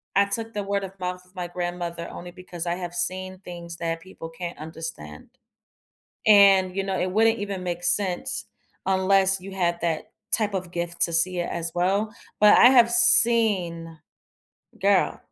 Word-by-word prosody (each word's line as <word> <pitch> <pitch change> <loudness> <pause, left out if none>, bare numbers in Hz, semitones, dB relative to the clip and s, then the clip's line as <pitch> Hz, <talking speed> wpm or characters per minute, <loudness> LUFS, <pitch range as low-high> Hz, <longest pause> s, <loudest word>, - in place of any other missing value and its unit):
I 200 +1 +5
took 225 +2 -4
the 205 - -2
word-of-mouth 190 -2 -4
of 180 +1 -27
my 175 -1 -4
grandmother 175 -1 -4
only 175 - -9
because 175 -1 -8
I 170 - 0
have 175 -1 -6
seen 185 +1 -3
things 170 -2 -9
that 165 -1 -3
people 165 -2 -10
can't 170 +1 -7
understand, 160 - -8 1.0
and, 195 -3 +6
you 195 - -1
know, 190 -1 -2
it 185 - -1
wouldn't 225 +2 +3
even 200 -2 -4
make 175 -1 -4
sense 185 -1 -1 0.4
unless 190 0 +2
you 195 +1 -9
had 175 -2 0
that 165 -2 -2 0.2
type 210 -3 +1
of 185 -2 -3
gift 175 0 -4
to 170 - -1
see 180 +2 +1
it, 175 - -2
as 170 0 -3
well. 200 +5 0 0.3
But 210 0 +7
I 245 - +9
have 240 -3 +5
seen 215 -9 +2 0.8
Girl - - +2
185 Hz, 165 wpm, -24 LUFS, 170-200 Hz, 1.0 s, I